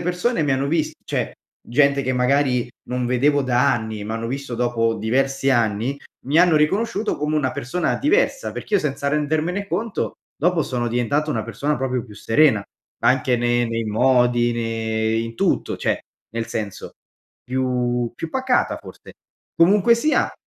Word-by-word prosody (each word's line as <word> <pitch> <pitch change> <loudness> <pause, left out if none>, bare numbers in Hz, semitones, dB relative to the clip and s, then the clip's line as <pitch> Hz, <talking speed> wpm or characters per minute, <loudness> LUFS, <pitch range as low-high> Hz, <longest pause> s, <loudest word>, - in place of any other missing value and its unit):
persone 180 +3 0
mi 145 - +1
hanno 135 +1 0
vist 155 -1 0
cioè - - -2 0.3
gente, 140 +3 +2
che 130 0 -1
magari 125 -1 +2 0.2
non 125 0 -2
vedevo 140 +4 +2
da 125 +1 +3
anni, 110 -2 -4
m'hanno 115 +1 -3
visto 135 -1 -4
dopo 115 -1 +1
diversi 135 +4 0
anni, 115 +1 +1 0.3
mi 145 +4 +3
hanno 175 -2 +5
riconosciuto 205 +7 +1
come 150 +1 -1
una 130 -4 +1
persona 155 +8 -2
diversa, 485 - +1
perché 210 - -4
io 200 - +4
senza 140 -1 -2
rendermene 155 +7 -1
conto, 225 +1 -3 0.2
dopo 170 0 +1
sono 120 -2 -2
diventato 140 +6 0
una - - -1
persona 150 +1 -2
proprio 130 -2 -2
più 105 - -13
serena 115 +1 +3 0.4
anche 130 0 +3
ne 120 0 +1
nei 115 0 -2
modi, 120 +1 +3
ne 110 -1 -1
in 115 0 -3
tutto, - - 0
cioè, - - 0 0.3
nel 115 0 -3
senso, 105 -3 -5 0.5
più 125 -2 -1
più 165 - -5
pacata 260 -1 +1
forse. - - -13 0.4
Comunque 200 +6 +5
sia 300 +6 +1
130 Hz, 155 wpm, -22 LUFS, 120-150 Hz, 0.5 s, hanno